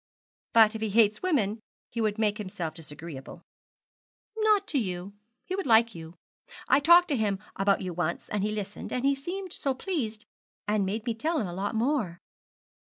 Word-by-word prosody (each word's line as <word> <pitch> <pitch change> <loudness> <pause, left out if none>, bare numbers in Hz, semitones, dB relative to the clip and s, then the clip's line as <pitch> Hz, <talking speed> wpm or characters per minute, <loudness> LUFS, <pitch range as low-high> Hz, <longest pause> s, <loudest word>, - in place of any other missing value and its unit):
'But 220 -1 +7
if 220 - -6
he 220 - 0
hates 215 0 +3
women 235 - +1 0.3
he 230 - -2
would 215 -1 0
make 215 -1 +1
himself 185 -5 -4
disagreeable.' 150 -3 -9 0.9
'Not 430 -2 +3
to 285 - +3
you. 185 -2 -4 0.3
He 375 - -3
would 390 -6 -3
like 230 0 +5
you. 165 0 -10 0.5
I - - +5
talked 345 +4 +7
to 290 - +2
him 210 -4 0 0.2
about 195 0 +2
you 185 -2 -4
once, 170 0 -2
and 210 - -2
he 210 - 0
listened, 210 -1 -5
and 275 +2 +1
seemed 355 +6 -5
so 275 -2 -1
pleased, 255 - -3 0.4
and 210 -2 +1
made 215 +3 -3
me 235 - 0
tell 315 +9 -1
him 240 - 0
a 175 - -5
lot 200 +4 -3
more.' 225 - 0
220 Hz, 180 wpm, -28 LUFS, 195-275 Hz, 0.9 s, But